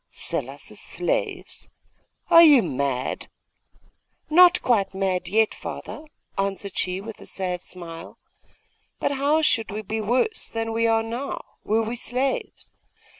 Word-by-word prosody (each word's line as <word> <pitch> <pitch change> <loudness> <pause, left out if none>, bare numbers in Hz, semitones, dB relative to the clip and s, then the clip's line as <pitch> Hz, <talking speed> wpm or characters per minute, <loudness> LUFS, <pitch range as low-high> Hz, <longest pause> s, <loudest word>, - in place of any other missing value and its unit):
'Sell - - -4
us - - -10
as - - -10
slaves? - - -3 0.6
Are 335 - +10
you 295 -7 +8
mad?' 135 -4 -2 1.0
'Not 355 +2 +7
quite 205 -6 +1
mad 185 -2 -1
yet, 220 +2 +3
father,' 310 - -7 0.3
answered 195 0 -2
she 185 0 -1
with 215 +2 -9
a - - -10
sad 180 -2 -3
smile. 170 -3 -10 0.8
'But - - 0
how 285 +3 +2
should 230 -7 +2
we 215 +1 -5
be 220 +2 -3
worse 250 - 0
than 225 0 -3
we 230 0 +2
are 225 0 +3
now, 240 +5 -4 0.2
were 220 +1 +1
we 225 +2 -3
slaves? 255 +3 -3
225 Hz, 140 wpm, -24 LUFS, 190-270 Hz, 1.0 s, Are